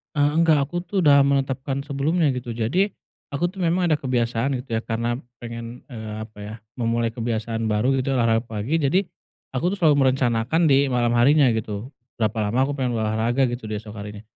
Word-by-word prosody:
Eee, 145 Hz, 0 st, +3 dB, 0.2 s
nggak, 145 Hz, -4 st, +3 dB
aku -, -, -8 dB
tuh 200 Hz, -, -4 dB
udah 140 Hz, -3 st, +6 dB
menetapkan 135 Hz, 0 st, 0 dB
sebelumnya, 145 Hz, +3 st, 0 dB
gitu, 125 Hz, -2 st, -3 dB
jadi 175 Hz, -, 0 dB, 0.4 s
aku 175 Hz, +5 st, 0 dB
tuh 195 Hz, -, -15 dB
memang 175 Hz, 0 st, +1 dB
ada 155 Hz, -, +3 dB
kebiasaan, 125 Hz, -1 st, 0 dB
gitu 115 Hz, -3 st, -3 dB
ya, -, -, -2 dB
karena 115 Hz, +1 st, -1 dB, 0.2 s
pengen, 115 Hz, 0 st, -7 dB
eee, 110 Hz, -2 st, -6 dB
apa, 110 Hz, -1 st, -10 dB
ya, 105 Hz, +1 st, -7 dB, 0.2 s
memulai 115 Hz, -1 st, 0 dB
kebiasaan 115 Hz, -1 st, -3 dB
baru, 110 Hz, +5 st, +1 dB
gitu, 135 Hz, +1 st, 0 dB
olahraga 115 Hz, -1 st, +2 dB
pagi, 115 Hz, +8 st, -2 dB
jadi 160 Hz, +6 st, +2 dB, 0.6 s
aku 175 Hz, +7 st, 0 dB
tuh -, -, -4 dB
selalu 145 Hz, -4 st, +5 dB
merencanakan 130 Hz, +5 st, +2 dB
di 140 Hz, 0 st, +5 dB
malam 120 Hz, -2 st, +1 dB
harinya, 140 Hz, +2 st, +5 dB
gitu, 110 Hz, +1 st, -3 dB, 0.3 s
berapa 110 Hz, +1 st, 0 dB
lama 120 Hz, +6 st, +1 dB
aku 140 Hz, +1 st, 0 dB
pengen 125 Hz, -2 st, -1 dB
olahraga, 115 Hz, +4 st, +1 dB
gitu, 120 Hz, -2 st, -5 dB
di 105 Hz, 0 st, -4 dB
esok 110 Hz, -1 st, -11 dB
harinya. 105 Hz, 0 st, -7 dB
125 Hz, 190 wpm, -23 LUFS, 115-140 Hz, 0.6 s, udah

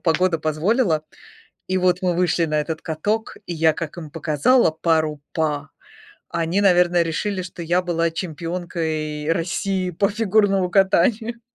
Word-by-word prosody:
погода 170 Hz, 0 st, +1 dB
позволила. 160 Hz, -, +1 dB, 0.7 s
И 185 Hz, 0 st, 0 dB
вот 180 Hz, 0 st, +2 dB
мы 180 Hz, -1 st, +1 dB
вышли 175 Hz, -1 st, +1 dB
на 155 Hz, -1 st, 0 dB
этот 160 Hz, +1 st, -4 dB
каток, 205 Hz, +8 st, -2 dB
и 175 Hz, -, -4 dB
я 160 Hz, 0 st, +3 dB
как 165 Hz, -1 st, -6 dB
им 155 Hz, -4 st, -8 dB
показала 165 Hz, -, +2 dB
пару 155 Hz, -2 st, 0 dB
па, 150 Hz, -3 st, -2 dB, 0.6 s
они, 170 Hz, +4 st, 0 dB
наверное, 175 Hz, -3 st, +4 dB
решили, 185 Hz, +4 st, -2 dB
что 175 Hz, -1 st, -8 dB
я 175 Hz, +2 st, +1 dB
была 170 Hz, -2 st, 0 dB
чемпионкой 160 Hz, -2 st, -3 dB
России 185 Hz, +2 st, -1 dB
по 195 Hz, +3 st, +1 dB
фигурному 205 Hz, -3 st, +2 dB
катанию. 210 Hz, +5 st, +2 dB
170 Hz, 140 wpm, -22 LUFS, 160-185 Hz, 0.7 s, наверное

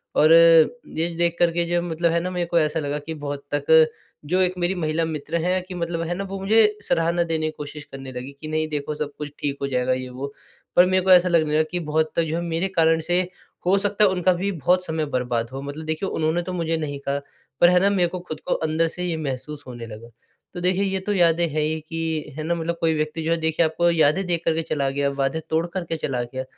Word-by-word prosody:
और 155 Hz, +2 st, +6 dB
ये 165 Hz, +1 st, +5 dB
देख 170 Hz, -1 st, +2 dB
कर 170 Hz, -1 st, +4 dB
के 170 Hz, 0 st, 0 dB
जो 175 Hz, 0 st, +1 dB
मतलब 170 Hz, -1 st, 0 dB
है 170 Hz, -, +2 dB
ना 180 Hz, +2 st, -3 dB
मेरे 175 Hz, -1 st, -1 dB
को 170 Hz, 0 st, +2 dB
ऐसा 155 Hz, +1 st, 0 dB
लगा 145 Hz, 0 st, -2 dB
कि 160 Hz, +3 st, -7 dB
बहुत 145 Hz, 0 st, -5 dB
तक 155 Hz, +2 st, +5 dB, 0.3 s
जो 180 Hz, +5 st, +1 dB
1 185 Hz, 0 st, +2 dB
मेरी 175 Hz, +1 st, 0 dB
महिला 160 Hz, -1 st, 0 dB
मित्र 160 Hz, +1 st, -3 dB
हैं 185 Hz, 0 st, +1 dB
कि 185 Hz, 0 st, -9 dB
मतलब 170 Hz, -1 st, -3 dB
है 175 Hz, -, -2 dB
ना 195 Hz, -, -3 dB
वो 195 Hz, 0 st, -5 dB
मुझे 210 Hz, +1 st, +3 dB
सराहना 170 Hz, +1 st, +1 dB
देने 160 Hz, -1 st, -1 dB
की 155 Hz, -, -2 dB
कोशिश 150 Hz, 0 st, -7 dB
करने 135 Hz, -1 st, -8 dB
लगी 125 Hz, +2 st, -7 dB
कि 155 Hz, -, -7 dB
नहीं 155 Hz, 0 st, -1 dB
देखो 150 Hz, 0 st, -3 dB
सब 150 Hz, -1 st, -4 dB
कुछ 150 Hz, -1 st, -6 dB
ठीक 140 Hz, -1 st, -2 dB
हो 140 Hz, -, 0 dB
जाएगा 130 Hz, -1 st, 0 dB
ये 130 Hz, 0 st, -4 dB
वो, 140 Hz, +3 st, -6 dB, 0.4 s
पर 180 Hz, -, +7 dB
मेरे 185 Hz, 0 st, +2 dB
को 190 Hz, -, +3 dB
ऐसा 180 Hz, 0 st, +7 dB
लगने 160 Hz, -3 st, +2 dB
लगा 155 Hz, -, +4 dB
कि 180 Hz, -, -1 dB
बहुत 155 Hz, 0 st, -1 dB
जो 160 Hz, -1 st, 0 dB
है 170 Hz, -, -1 dB
मेरे 170 Hz, +2 st, -1 dB
कारण 165 Hz, 0 st, +4 dB
से 175 Hz, +3 st, +2 dB, 0.4 s
हो 190 Hz, +2 st, +4 dB
सकता 205 Hz, +1 st, +2 dB
है 205 Hz, -, +6 dB
उनका 185 Hz, 0 st, +2 dB
भी 195 Hz, +3 st, -2 dB
बहुत 180 Hz, +3 st, +1 dB
समय 160 Hz, -2 st, -2 dB
बर्बाद 120 Hz, -4 st, -2 dB
हो। 135 Hz, +1 st, -6 dB
मतलब 145 Hz, +3 st, -7 dB
देखिए 160 Hz, +5 st, -2 dB
उन्होंने 160 Hz, 0 st, 0 dB
ने 175 Hz, -, +1 dB
तो 185 Hz, -, -5 dB
मुझे 165 Hz, -2 st, -1 dB
नहीं 145 Hz, -3 st, -4 dB
कहा 140 Hz, +1 st, 0 dB, 0.4 s
पर 175 Hz, -, +8 dB
है 180 Hz, 0 st, +5 dB
ना 195 Hz, +2 st, +3 dB
मेरे 185 Hz, -3 st, +2 dB
को 180 Hz, -, -5 dB
खुद 155 Hz, -4 st, -7 dB
को -, -, +2 dB
अंदर 160 Hz, +1 st, 0 dB
से 180 Hz, +2 st, -5 dB
ये 170 Hz, -2 st, -1 dB
महसूस 145 Hz, 0 st, -5 dB
होने 120 Hz, -2 st, -7 dB
लगा। 115 Hz, +2 st, -10 dB, 0.4 s
तो 175 Hz, -, -6 dB
देखिए 185 Hz, +2 st, +2 dB
ये 190 Hz, -1 st, 0 dB
तो 205 Hz, +2 st, -2 dB
यादें 170 Hz, -2 st, +3 dB
हैं 155 Hz, 0 st, -2 dB
ही 155 Hz, +1 st, -1 dB
कि, 160 Hz, -3 st, -3 dB
है 155 Hz, -, -3 dB
ना? 170 Hz, +2 st, 0 dB
मतलब 170 Hz, +1 st, -2 dB
कोई 165 Hz, -1 st, +3 dB
व्यक्ति 155 Hz, +1 st, -2 dB
जो 165 Hz, -, -1 dB
है 170 Hz, -, +2 dB
देखिए 160 Hz, +1 st, +1 dB
आपको 170 Hz, +2 st, +1 dB
यादें 165 Hz, +3 st, +2 dB
दे 170 Hz, -1 st, +2 dB
कर 165 Hz, 0 st, 0 dB
के 165 Hz, -, 0 dB
चला 145 Hz, -4 st, -1 dB
गया, 140 Hz, +1 st, 0 dB
वादे 140 Hz, +3 st, -1 dB
तोड़ 160 Hz, +1 st, +1 dB
कर 185 Hz, -2 st, -2 dB
के 165 Hz, 0 st, -3 dB
चला 130 Hz, -5 st, -2 dB
गया, 130 Hz, +2 st, -5 dB
160 Hz, 260 wpm, -23 LUFS, 150-175 Hz, 0.4 s, पर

